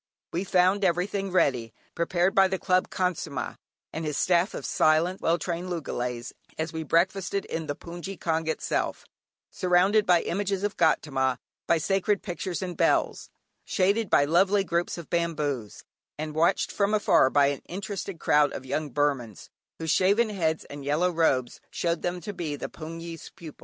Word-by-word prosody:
We 180 +4 -1
found 185 +2 +3
everything 195 +2 0
ready, 125 -10 +1 0.2
prepared 175 +2 +1
by 195 -1 +5
the 190 0 -2
Club 185 0 +1
Khansamah, 165 -8 -2 0.4
and 160 - -4
his 150 -2 -2
staff 180 +2 +2
of - - -6
silent, 160 +4 +2
well 165 +1 +2
trained 175 +1 -4
loogalays, 125 -7 -4 0.2
and 160 0 -2
we 160 - -4
breakfasted 185 +5 +1
in 160 -1 -4
the 145 - -2
"hpoongyi 175 +4 -8
kyaung" 160 -1 -1
itself, 160 - -2 0.5
surrounded 185 +4 +3
by 175 -2 +4
images 195 +1 -2
of 205 - -1
Gaudama, 135 -6 +1 0.3
by 170 - +4
sacred 195 +4 0
pictures 185 -1 -4
and 180 -2 -4
bells; - - +1 0.3
shaded 200 +3 +1
by 145 - +4
lovely 190 +6 +3
groups 175 -1 -1
of 170 - -8
bamboos, 150 -9 -2 0.3
and 155 0 -4
watched 160 +2 +2
from 200 +1 +1
afar 205 -9 +4
by 140 0 +4
an 140 - -9
interested 195 -1 -5
crowd 145 -1 +3
of 130 - -7
young 150 +3 -2
Burmans, 130 -6 -1 0.3
whose 160 -1 -2
shaven 205 +5 +3
heads 160 -6 -1
and 145 0 -9
yellow 155 +6 +1
robes 135 -7 +1
showed 170 -1 -1
them 175 0 -2
to 205 +5 -6
be 165 -6 -3
the - - -6
hpoongyi's 165 0 -8
pupils. 165 -5 -11
170 Hz, 165 wpm, -27 LUFS, 150-185 Hz, 0.5 s, by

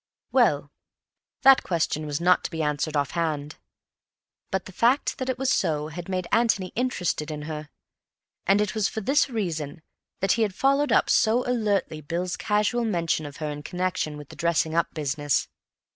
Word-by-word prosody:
Well, - - +3 0.7
that 270 -1 +8
question 160 -3 -1
was 145 -1 -2
not 180 +1 +4
to - - -1
be 160 -2 -3
answered 150 +1 -1
off 140 -1 0
hand. 155 -3 -2 0.9
But 190 -1 -2
the - - -9
fact 240 +10 +2
that 260 0 -2
it 255 - -1
was 265 +1 +1
so 150 -1 0
had 170 +3 -7
made 185 -1 -1
Antony 220 -6 +2
interested 180 -11 -1
in 150 -1 -5
her; 150 -1 -6 0.8
and 195 +2 +5
it 210 - -1
was 215 -3 +1
for 220 - -4
this 275 +7 +2
reason 160 - -3 0.4
that 195 0 +2
he 230 - +2
had 205 -4 0
followed 275 +2 +2
up - - +4
so 235 +2 +3
alertly 210 -9 0
Bill's 175 +5 -2
casual 210 +3 +1
mention 170 -7 0
of 145 - -10
her 155 -2 -3
in 145 0 -6
connection 180 -2 -2
with 150 -2 -11
the - - -11
dressing 165 -1 +1
up 170 0 +1
business. 145 -1 0
175 Hz, 180 wpm, -25 LUFS, 155-220 Hz, 0.9 s, that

